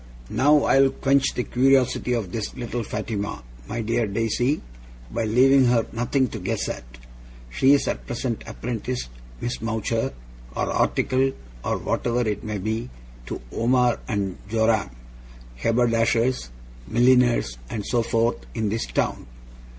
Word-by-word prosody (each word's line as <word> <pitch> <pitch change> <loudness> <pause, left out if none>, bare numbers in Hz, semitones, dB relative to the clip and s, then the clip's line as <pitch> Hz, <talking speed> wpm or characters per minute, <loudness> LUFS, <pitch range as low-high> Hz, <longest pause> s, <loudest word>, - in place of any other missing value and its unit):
Now 145 +2 +4
I'll 135 0 +5
quench 135 0 +1
the 125 - 0
curiosity 130 -1 +2
of 110 -7 -2
this 110 -1 -4
little 120 -1 -3
Fatima, 105 - -4 0.2
my 115 +2 -3
dear 115 0 0
Daisy, 115 +7 0 0.5
by 110 - -1
leaving 130 +4 +5
her 120 -2 +3
nothing 125 +3 +1
to - - -6
guess - - -2
at. - - -5 0.7
She 135 - +5
is 145 - +2
at - - -3
present 120 -1 -3
apprenticed, 120 - -4 0.3
Miss 120 - -3
Mowcher, 115 0 -1 0.4
or - - -1
articled, 135 +1 +1 0.3
or - - 0
whatever 120 0 0
it 105 -2 -2
may 105 -1 -3
be, 110 +4 -3 0.4
to - - -5
Omer 125 0 +2
and 100 -5 -2
Joram, 110 -4 +2 0.7
Haberdashers, 115 - +2 0.4
Milliners, 120 - +3
and 105 -2 -4
so 120 - +1
forth, 115 +1 +1 0.2
in 110 -2 0
this 110 +2 -2
town. - - -1
115 Hz, 135 wpm, -24 LUFS, 110-125 Hz, 0.7 s, I'll